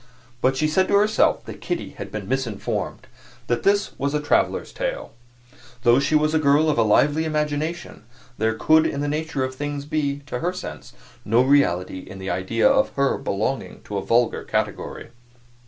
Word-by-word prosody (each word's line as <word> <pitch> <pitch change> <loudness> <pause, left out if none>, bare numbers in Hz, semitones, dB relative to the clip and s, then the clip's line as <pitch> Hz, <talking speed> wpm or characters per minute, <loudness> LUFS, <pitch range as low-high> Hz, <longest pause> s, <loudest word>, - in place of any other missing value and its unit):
But 130 +1 +2
she 155 - +2
said 185 +5 +2
to 200 - +2
herself 210 +2 +3
that - - -9
Kitty - - -3
had - - -8
been 105 -3 -5
misinformed 130 -5 -3 0.4
that 120 - -1
this 200 +1 +2
was 140 +2 -1
a - - +2
traveler's 150 - 0
tale. - - -4 0.7
Though 120 +1 +5
she 140 +2 +1
was 155 0 +2
a 160 - +3
girl 150 +1 +4
of 130 - -1
a - - +6
lively 145 +8 +3
imagination, 155 -3 -3 0.3
there 110 0 +1
could 160 +7 +4
in 140 - -3
the 145 - -1
nature 150 -2 -2
of 130 0 -3
things 145 +1 -4
be, 145 -2 -2
to 125 -4 -4
her 175 +5 -1
sense, 180 - -8 0.3
no 115 +4 +3
reality 95 -10 +2
in 95 +1 -10
the 95 0 -4
idea 95 - +1
of 270 0 +3
her 140 -1 +2
belonging 110 +7 -3
to 105 - -5
a - - -6
vulgar 120 0 +1
category. - - -3
140 Hz, 185 wpm, -23 LUFS, 120-155 Hz, 0.7 s, a